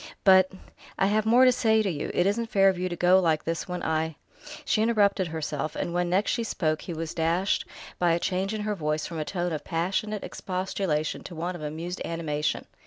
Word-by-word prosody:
"But 190 -1 +6 0.3
" - - -24
"I 195 - +3
have 215 +2 +1
more 245 +3 +6
to 255 - +7
say 220 -2 +3
to 200 - 0
you. 145 - -4
It 175 - +3
isn't 225 +3 0
fair 195 -2 +5
of 185 -2 -2
you 185 0 -1
to 175 - -3
go 180 +2 +5
like 160 -4 +1
this, 165 +3 -3
when 180 -1 -4
I 160 0 -1 0.2
" 300 0 -12
She 215 - +2
interrupted 205 -4 +2
herself, 155 -2 -3
and 170 - -3
when 175 0 0
next 190 +4 +2
she 235 - -1
spoke 155 -8 -1
he - - -7
was 160 0 -4
dashed 170 +4 +1 0.3
by 175 -1 +3
a 170 - +1
change 190 +3 -1
in 215 -1 -3
her 210 0 -1
voice 155 -4 -2
from 165 -2 -5
a 155 - -2
tone 175 -1 -2
of 155 - -4
passionate 190 +5 -2
expostulation 185 -4 -2
to 175 - -8
one 175 +3 -3
of 175 - -8
amused 160 +4 -5
animation. 155 -3 -2
180 Hz, 230 wpm, -27 LUFS, 160-200 Hz, 0.3 s, to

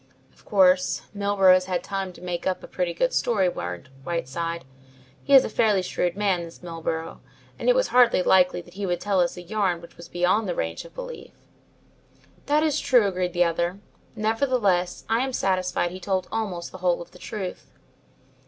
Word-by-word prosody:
"Of - - -25
course, 185 -2 +3
Milburgh 200 -2 +4
has 185 0 +3
had 180 -2 -2
time 195 -2 -3
to - - -15
make 180 0 -3
up 185 - -1
a - - -8
pretty 180 -2 -2
good 255 +10 0
story," 205 -6 +2
warned 90 - -5
Whiteside. 170 0 -3 0.6
"He 280 - +5
is 265 - +8
a - - -1
fairly 210 -3 +2
shrewd 180 0 -1
man, 195 -4 +1
this 170 +1 -11
Milburgh, 165 -1 -4 0.4
and - - +1
it - - +5
was - - +2
hardly 245 -6 +5
likely 180 -1 +4
that 175 0 -17
he 195 +1 -4
would 175 -1 -1
tell 200 -2 0
us 175 +1 0
a 180 - -7
yarn 190 -2 0
which 170 - -15
was 170 0 -11
beyond 185 +4 +1
the 175 - -1
range 80 0 -3
of - - -15
belief." - - -8 1.1
"That 300 +1 +3
is 305 -3 +1
true," 245 -5 +4
agreed 180 -2 -1
the 175 0 +4
other, 170 +2 -1 0.4
"nevertheless, 215 -5 0
I 225 +1 +2
am 265 +1 -1
satisfied 185 -4 0
he 185 - -8
told 185 0 -1
almost 195 -6 -3
the 185 - -10
whole 175 -1 +1
of - - -22
the 180 - -16
truth." 195 -3 -6
185 Hz, 195 wpm, -25 LUFS, 175-210 Hz, 1.1 s, is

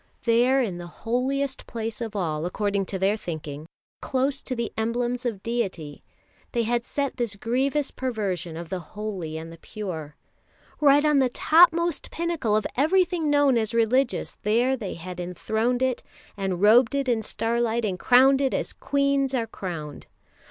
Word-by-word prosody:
There 245 +3 +4
in 185 -7 -4
the 175 - -7 0.2
holiest 260 +3 -1
place 225 -1 -5
of 220 -2 -4
all, 160 -4 -1
according 200 +1 -1
to 195 - -3
their 195 +2 +2
thinking, 155 -6 -6 0.3
close 270 +1 0
to 255 - -4
the 235 -2 -3
emblems 240 +2 -1
of 205 -5 -4
deity, 185 -11 -3 0.5
they 235 -2 +1
had 235 +1 0
set 280 +1 -3
this 235 -4 -1
grievous 265 +7 0
perversion 195 -10 -3
of 170 -1 -7
the 185 - -3
holy 185 -5 -6
and 165 +1 -7
the 165 - -14
pure. 160 -9 -6 0.6
Right 290 0 +5
on 300 -2 +4
the 260 -2 +3
topmost 335 +3 +4
pinnacle 330 -10 -1
of 215 - +1
everything 340 +2 +2
known 285 -4 +4
as 220 +1 -2
religious 240 +3 +1
there 240 +5 +2
they 215 -7 -5
had 180 +1 -8
enthroned 220 +8 -1
it, 260 -2 0 0.3
and 190 -2 -2
robed 235 +5 +6
it 275 -1 0
in 235 -3 +1
starlight 230 +1 0
and 185 -3 -2
crowned 265 +5 +5
it 270 - +1
as - - -3
queens 280 -1 0
are 235 -3 0
crowned. 165 -9 -7
230 Hz, 165 wpm, -25 LUFS, 195-265 Hz, 0.6 s, robed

